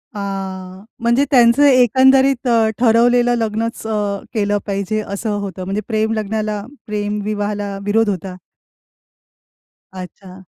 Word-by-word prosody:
आह, 190 -2 -6 0.2
म्हणजे 235 +4 +2
त्यांचं 245 +2 +5
एकंदरीत 265 +1 +4 0.3
ठरवलेलं 240 +1 +3
लग्नचं 225 0 -3 0.3
अ, - - -16
केलं 205 -2 0
पाहिजे 200 +1 -2
असं 205 +1 -4
होतं? 190 -2 -6
म्हणजे 195 +3 -2
प्रेम 220 -1 0
लग्नाला, 215 -1 -2 0.3
प्रेम 210 0 -3
विवाहाला 205 -1 -3
विरोध 220 +1 +2
होता? 185 -1 -4 1.6
अच्छा. 185 0 -10
210 Hz, 110 wpm, -18 LUFS, 200-235 Hz, 1.6 s, त्यांचं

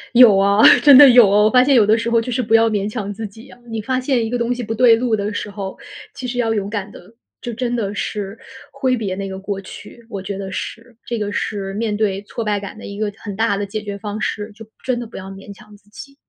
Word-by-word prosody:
有 235 -5 +8
啊， 200 +2 +3 0.2
真 285 -2 +8
的 285 +1 +10
有。 245 -3 +7
我 210 +2 +4
发 250 +3 +5
现 275 +2 +2
有 225 -5 +5
的 220 +1 +4
时 230 0 -3
候 230 -1 +3
就 250 - -5
是 250 +1 -1
不 220 0 -2
要 225 0 +5
勉 205 -2 -1
强 210 -2 -5
自 220 +2 -6
己 220 +4 -12
啊。 - - -15
你 225 -1 -4
发 255 +4 -1
现 255 -2 0
一 225 - -3
个 245 - -1
东 235 +1 -1
西 245 - -5
不 225 -1 -6
对 240 -1 +6
路 230 -1 0
的 205 0 -3
时 205 - -4
候， 195 -2 -6 0.4
其 255 - -7
实 245 0 -5
要 225 -2 +1
勇 200 -2 -2
敢 205 -1 -5
地 205 +4 -16 0.3
就 240 - -5
真 240 +1 -3
的 205 -3 -3
是 205 0 -4 0.3
挥 265 -2 0
别 205 -6 -3
那 195 0 -5
个 190 0 -7
过 195 0 -4
去， 230 +4 -12
我 195 - -5
觉 195 +1 -5
得 195 -1 -6
是。 230 +5 -7
这 240 - -4
个 210 -2 -3
是 195 -1 -3
面 210 0 -2
对 200 -2 -1
挫 205 +3 -6
败 210 -1 -1
感 200 +1 -9
的 - - -10
一 200 0 -8
个 215 -1 -1
很 205 -3 -7
大 220 -1 0
的 205 - -2
解 210 +2 -5
决 205 -1 -6
方 210 +1 -6
式， 210 0 -3
就 215 +2 -12 0.2
真 255 -2 -1
的 240 - -6
不 225 - -11
要 190 0 -8
勉 195 +1 -11
强 210 +1 -15
自 205 0 -24
己。 275 +6 -12
215 Hz, 300 characters per minute, -19 LUFS, 200-235 Hz, 0.4 s, 的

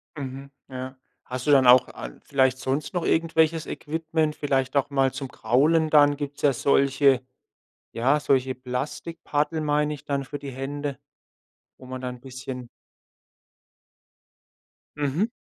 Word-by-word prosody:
Mhm, 135 -1 -7 0.2
ja. 130 0 -7 0.3
Hast 130 0 -5
du - - +5
dann 135 -3 +6
auch 125 +1 +7
an - - -9
vielleicht 130 -2 +2
sonst 135 +3 -2
noch 175 -2 -1
irgendwelches 160 -1 +2
Equipment? 160 0 -2
Vielleicht 135 -2 -1
auch 140 - +1
mal 135 -2 +2
zum 135 +1 -5
Kraulen 150 +8 +2
dann 145 -1 +5
gibt's 145 0 -6
ja 145 -2 +4
solche, 140 0 +3 0.7
ja, 130 +6 +2
solche 130 -2 +1
Plastikpaddel, 150 +4 -3
meine 150 0 +1
ich 145 -1 -10
dann 140 -1 -2
für 145 +2 -6
die 140 -1 -7
Hände, 140 +2 -4 0.8
wo - - -15
man 130 0 -6
dann 125 -1 -6
bisschen 130 -1 -7 2.3
Mhm. 150 +8 0
140 Hz, 135 wpm, -25 LUFS, 130-150 Hz, 2.3 s, auch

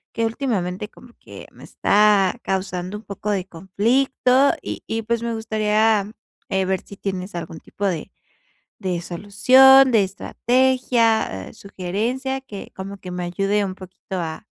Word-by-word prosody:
que, 230 - +1
últimamente, 210 -6 -3
como 245 +1 -17
que, - - -12
me - - -16
está 205 -2 +3
causando 185 0 -3
un 210 - -12
poco 205 0 -4
de 190 -3 -1
conflicto, 250 - +2
y - - -6
y, 225 0 -2
pues, 230 +1 -2
me 235 0 -2
gustaría, 215 -1 +1 0.4
eh, 190 0 0
ver 190 0 -1
si 200 - -11
tienes 190 -1 -5
algún 165 -1 -6
tipo 205 - -6
de 170 -5 -3 0.7
de 180 -2 -2
solución, 255 +10 +6
de 220 -3 +5
estrategia, 230 - +1
eh, - - -13
sugerencia, 225 +8 -3
que 210 -7 -10
como 195 +1 -7
que 185 -2 -10
me 180 0 -4
ayude 195 +4 0
un 190 -1 -4
poquito 185 0 -9
a 170 +5 -5
205 Hz, 150 wpm, -22 LUFS, 185-230 Hz, 0.7 s, solución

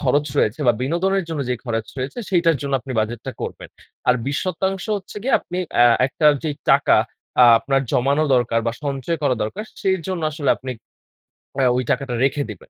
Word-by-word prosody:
খরচ 145 +2 +1
রয়েছে 110 +8 +1
বা 120 - +6
বিনোদনের 185 +7 0
জন্য 160 -3 -3
যে - - +2
খরচ 115 -3 -2
রয়েছে 135 - -4
সেইটার 170 -4 +3
জন্য 140 - -3
আপনি 130 - -7
বাজেটটা 115 +4 -4
করবেন। - - -6 0.4
আর 125 - +6
২০% 185 +6 -2
হচ্ছে 195 0 -10
গিয়ে 265 - +2
আপনি 180 - -6 0.2
অ্যা 120 - +7 0.2
একটা 150 +3 0 0.2
যে 155 - 0 0.2
টাকা - - +5 0.5
আ - - +10
আপনার 135 +4 0
জমানো 140 +4 +2
দরকার 115 -2 +2
বা 115 - +1
সঞ্চয় 140 +4 -2
করা 140 -3 +2
দরকার 190 - -4 0.2
সেই 190 -1 +2
জন্য 185 -3 -3
আসলে 145 -2 0
আপনি 130 - -7 0.9
অ্যা 135 -2 +2
ওই 125 - 0
টাকাটা 135 -1 -1
রেখে 140 +1 0
দিবেন। 100 - -10
140 Hz, 185 wpm, -21 LUFS, 125-170 Hz, 0.9 s, আ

